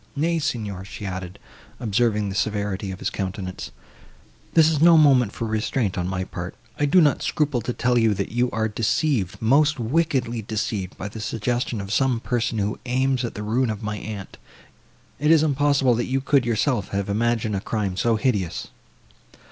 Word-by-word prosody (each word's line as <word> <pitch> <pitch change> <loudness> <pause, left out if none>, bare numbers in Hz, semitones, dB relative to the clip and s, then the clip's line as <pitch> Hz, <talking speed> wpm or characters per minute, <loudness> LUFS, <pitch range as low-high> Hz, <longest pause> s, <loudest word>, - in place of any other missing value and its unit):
Nay, 165 +3 +1
Signor," 105 - -3
she 100 +1 -8
added, 95 0 -5 0.4
observing 105 -2 +1
the - - -4
severity 100 -1 -1
of 95 - -5
his - - -3
countenance, 95 -1 -5 0.9
"this 160 -2 +7
is 155 -2 +1
no 170 0 +7
moment 135 -8 +5
for 115 - -4
restraint, 110 -1 -1
on 90 0 -2
my 95 0 -2
part; - - -6 0.2
I 145 - +3
do 165 +6 +5
not 145 -5 +3
scruple 145 -5 0
to 125 - -3
tell 120 0 +1
you, 110 -2 +3
that 100 0 -3
you 120 +2 +1
are 110 -1 -1
deceived—most 125 - +1
wickedly 125 -2 0
deceived, 105 -3 -3
by 100 - -5
the 110 +2 -8
suggestion 120 +2 -2
of 100 +1 -4
some 130 -3 +2
person, 120 -1 -1
who 105 0 -1
aims 130 +1 +1
at 120 - -4
the 105 - -5
ruin 120 +4 +1
of 110 0 -4
my 105 0 -3
aunt:—it 110 +7 -8
is 160 -1 +6
impossible, 140 -3 +3
that 120 +1 -1
you 135 +1 +1
could 135 -2 +2
yourself 115 -2 +1
have 100 -1 -2
imagined 110 0 0
a 95 - -2
crime 100 -4 -2
so 115 +4 +2
hideous." 100 - -1
115 Hz, 180 wpm, -23 LUFS, 100-130 Hz, 0.9 s, this